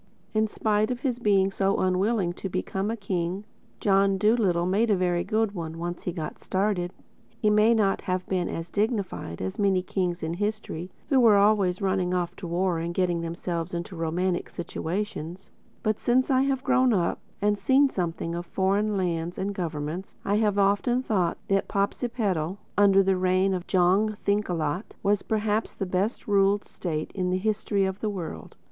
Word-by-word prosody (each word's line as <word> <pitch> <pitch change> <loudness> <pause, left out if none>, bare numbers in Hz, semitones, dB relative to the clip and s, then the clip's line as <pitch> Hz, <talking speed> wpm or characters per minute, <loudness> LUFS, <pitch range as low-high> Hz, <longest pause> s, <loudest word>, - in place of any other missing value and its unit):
In 215 0 +2
spite 215 0 0
of 250 -1 -3
his 250 -4 -1
being 195 -4 +3
so 195 0 +1
unwilling 185 0 +1
to 195 - -6
become 190 +2 -2
a 230 - -2
king, 185 -1 -2 0.4
John 195 -1 +3
Dolittle 200 -5 +2
made 205 +6 +2
a 205 - +4
very 180 -1 +1
good 220 -1 0
one—once 170 -1 -5
he 180 - 0
got 165 -3 -6
started. 190 -2 0 0.5
He 210 - +3
may 215 +2 +5
not 200 -3 +2
have 185 0 -2
been 185 -2 -1
as 165 +1 -5
dignified 200 - -2
as 95 - -4
many 195 -3 +2
kings 180 -3 -2
in 160 +1 -2
history 205 -3 -3 0.2
who 270 - +4
were 225 -4 +6
always 200 -2 +3
running 190 -2 +1
off 175 -1 -2
to 180 - -6
war 175 0 0
and 170 +1 -4
getting 175 -2 +1
themselves 170 0 -3
into 175 +2 -5
romantic 175 +2 -1
situations; 175 +1 -5 0.3
but 215 -1 0
since 255 +2 +2
I 260 0 +4
have 270 -1 0
grown 255 -2 +3
up 175 -4 0 0.2
and 205 0 +1
seen 275 +2 +4
something 170 -2 -2
of 175 0 -5
foreign 200 +2 +1
lands 175 -2 -2
and 200 +1 -2
governments 165 0 -4
I 205 +1 +2
have 210 -2 +1
often 205 +6 +2
thought 185 -8 0
that 195 0 +1
Popsipetel 200 -4 -1 0.2
under 195 -1 +5
the 190 -1 +2
reign 185 +1 +2
of 180 -1 -4
Jong 195 +4 +3
Thinkalot 180 -3 -1
was 205 0 +2
perhaps 215 0 -1
the 195 - -3
best 190 +4 -1
ruled 200 0 +3
state 155 -4 -4
in 180 -2 -1
the 185 - +1
history 205 0 0
of 190 +1 -3
the 215 - -1
world. 185 -6 -6
195 Hz, 175 wpm, -26 LUFS, 175-210 Hz, 0.5 s, were